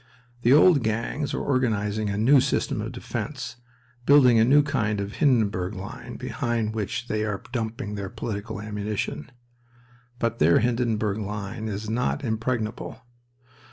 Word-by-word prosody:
The 120 Hz, -, +3 dB
old 150 Hz, +1 st, +7 dB
gangs 115 Hz, +6 st, -2 dB
are -, -, -2 dB
organizing 110 Hz, -5 st, 0 dB
a 100 Hz, -, -2 dB
new 130 Hz, +6 st, +5 dB
system -, -, 0 dB
of -, -, -4 dB
defense, -, -, -5 dB, 0.5 s
building 130 Hz, -5 st, +7 dB
a -, -, +6 dB
new 145 Hz, +5 st, +5 dB
kind 110 Hz, -8 st, 0 dB
of 100 Hz, +1 st, -4 dB
Hindenburg 105 Hz, -, +2 dB
line 95 Hz, 0 st, -8 dB
behind 115 Hz, -2 st, -2 dB
which 115 Hz, +2 st, -3 dB
they 110 Hz, -1 st, -1 dB
are 105 Hz, -2 st, -3 dB
dumping 110 Hz, -4 st, -3 dB
their 100 Hz, -2 st, -4 dB
political 110 Hz, +1 st, -5 dB
ammunition. 105 Hz, -7 st, -4 dB, 0.9 s
But 115 Hz, -1 st, -1 dB
their 85 Hz, +2 st, +5 dB
Hindenburg 115 Hz, -3 st, 0 dB
line 105 Hz, +2 st, -4 dB
is 105 Hz, 0 st, -4 dB
not 125 Hz, +6 st, -1 dB
impregnable. 115 Hz, -1 st, -3 dB
110 Hz, 140 wpm, -25 LUFS, 105-120 Hz, 0.9 s, old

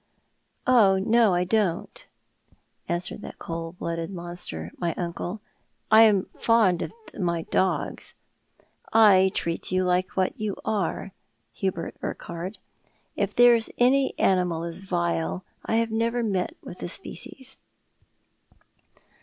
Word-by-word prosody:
" -, -, -47 dB, 0.2 s
Oh, 220 Hz, -7 st, +5 dB
no, 220 Hz, 0 st, +3 dB
I 175 Hz, -, +2 dB
don't," 185 Hz, -2 st, -1 dB, 0.8 s
answered 175 Hz, +1 st, -2 dB
that -, -, -9 dB
cold 165 Hz, +1 st, -6 dB
blooded 165 Hz, 0 st, -3 dB
monster, 175 Hz, -, -5 dB
my 170 Hz, -2 st, -1 dB
uncle, 175 Hz, +3 st, -4 dB, 0.2 s
" -, -, -46 dB
I 220 Hz, +1 st, +9 dB
am 210 Hz, -4 st, +5 dB
fond 215 Hz, -7 st, +3 dB
of -, -, -3 dB, 0.3 s
my 170 Hz, -3 st, 0 dB
dogs. 190 Hz, +3 st, -1 dB, 0.8 s
I 200 Hz, -4 st, +6 dB
treat 170 Hz, +1 st, -2 dB
you 185 Hz, 0 st, +2 dB
like 180 Hz, +1 st, 0 dB
what 185 Hz, -1 st, 0 dB
you 215 Hz, -2 st, -2 dB
are, 200 Hz, -2 st, -1 dB, 0.4 s
Hubert 185 Hz, +4 st, -3 dB
Urquhart. 175 Hz, +4 st, -5 dB, 0.6 s
If -, -, -1 dB
there's 240 Hz, -2 st, +6 dB
any 265 Hz, +2 st, +3 dB
animal 180 Hz, -3 st, +2 dB
as 170 Hz, +1 st, -5 dB
vile 85 Hz, -, -2 dB, 0.2 s
I -, -, 0 dB
have 230 Hz, 0 st, +1 dB
never 230 Hz, +2 st, 0 dB
met 200 Hz, -, -1 dB
with -, -, -9 dB
the -, -, -4 dB
species." 265 Hz, 0 st, -6 dB
185 Hz, 130 wpm, -26 LUFS, 170-220 Hz, 0.8 s, I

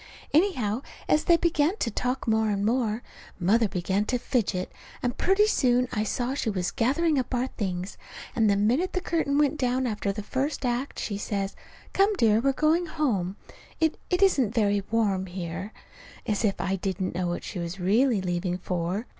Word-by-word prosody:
Anyhow, 260 Hz, -, +2 dB, 0.3 s
as 305 Hz, -, +3 dB
they 340 Hz, -1 st, +6 dB
began 335 Hz, +2 st, +1 dB
to 230 Hz, -, -1 dB
talk 250 Hz, +4 st, -2 dB
more 220 Hz, -1 st, +2 dB
and 200 Hz, -1 st, 0 dB
more, 230 Hz, -1 st, 0 dB, 0.4 s
Mother 215 Hz, +5 st, +3 dB
began 190 Hz, +2 st, 0 dB
to 250 Hz, -, 0 dB
fidget, 210 Hz, -7 st, -1 dB, 0.3 s
and 245 Hz, -1 st, 0 dB
pretty 390 Hz, +3 st, +3 dB
soon 250 Hz, -, +2 dB
I 210 Hz, -, 0 dB
saw 245 Hz, +4 st, -1 dB
she 275 Hz, -5 st, -1 dB
was 185 Hz, -3 st, -1 dB
gathering 290 Hz, +5 st, +2 dB
up 255 Hz, 0 st, -2 dB
our 245 Hz, +1 st, +1 dB
things; 190 Hz, -6 st, -4 dB, 0.4 s
and 225 Hz, -2 st, +3 dB
the 200 Hz, -, +4 dB
minute 240 Hz, -, +1 dB
the 370 Hz, -, +1 dB
curtain 320 Hz, -5 st, 0 dB
went 295 Hz, 0 st, +2 dB
down 255 Hz, 0 st, +1 dB
after 210 Hz, -3 st, -1 dB
the 210 Hz, +1 st, -5 dB
first 270 Hz, +4 st, -2 dB
act, 245 Hz, +3 st, -2 dB
she 200 Hz, -2 st, -3 dB
says: 200 Hz, -2 st, -2 dB, 0.4 s
"Come, 395 Hz, +2 st, +4 dB
dear, 220 Hz, -, +4 dB
we're 275 Hz, +4 st, +2 dB
going 315 Hz, +5 st, +2 dB
home. 220 Hz, -, -1 dB, 0.4 s
It 320 Hz, -1 st, +1 dB
it 360 Hz, +1 st, +2 dB
isn't 265 Hz, -, +3 dB
very 205 Hz, -3 st, +2 dB
warm 200 Hz, -4 st, +1 dB
here." 180 Hz, +2 st, -5 dB, 0.5 s
As 215 Hz, -1 st, 0 dB
if 200 Hz, -3 st, +1 dB
I 195 Hz, 0 st, 0 dB
didn't 190 Hz, 0 st, -2 dB
know 180 Hz, +1 st, -1 dB
what 175 Hz, -, -3 dB
she -, -, -5 dB
was 170 Hz, +2 st, -5 dB
really 215 Hz, +4 st, +3 dB
leaving 180 Hz, 0 st, -1 dB
for! 180 Hz, +4 st, -2 dB
225 Hz, 185 wpm, -27 LUFS, 195-275 Hz, 0.5 s, they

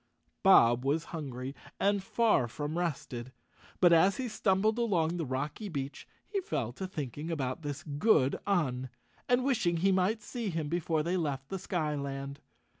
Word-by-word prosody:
Bob 125 Hz, -, +6 dB
was 145 Hz, +4 st, +1 dB
hungry 135 Hz, -4 st, -5 dB, 0.3 s
and 200 Hz, 0 st, +2 dB
far 210 Hz, -, +2 dB
from 145 Hz, +6 st, -4 dB
rested, 135 Hz, -8 st, -3 dB, 0.5 s
but 175 Hz, -2 st, +6 dB
as 185 Hz, +4 st, +5 dB
he 260 Hz, -, -2 dB
stumbled 215 Hz, +1 st, +1 dB
along 175 Hz, -8 st, +1 dB
the 165 Hz, -4 st, -2 dB
rocky 145 Hz, -, -3 dB
beach 140 Hz, -4 st, -5 dB, 0.2 s
he 400 Hz, -2 st, -2 dB
fell 120 Hz, -, -2 dB
to 190 Hz, +9 st, -5 dB
thinking 150 Hz, -2 st, -5 dB
about 135 Hz, -4 st, -2 dB
this 145 Hz, 0 st, -5 dB
good 145 Hz, -, +2 dB
Un 130 Hz, -10 st, 0 dB, 0.4 s
and 250 Hz, 0 st, +4 dB
wishing 215 Hz, -11 st, +1 dB
he 195 Hz, +4 st, +3 dB
might 190 Hz, +4 st, +1 dB
see 230 Hz, -1 st, -4 dB
him 160 Hz, -4 st, -3 dB
be¬ 175 Hz, +1 st, 0 dB
fore 160 Hz, -1 st, 0 dB
they 175 Hz, +3 st, 0 dB
left 140 Hz, -5 st, -2 dB
the 195 Hz, -, -3 dB
skyland. 140 Hz, -6 st, -3 dB
165 Hz, 165 wpm, -31 LUFS, 140-195 Hz, 0.5 s, Bob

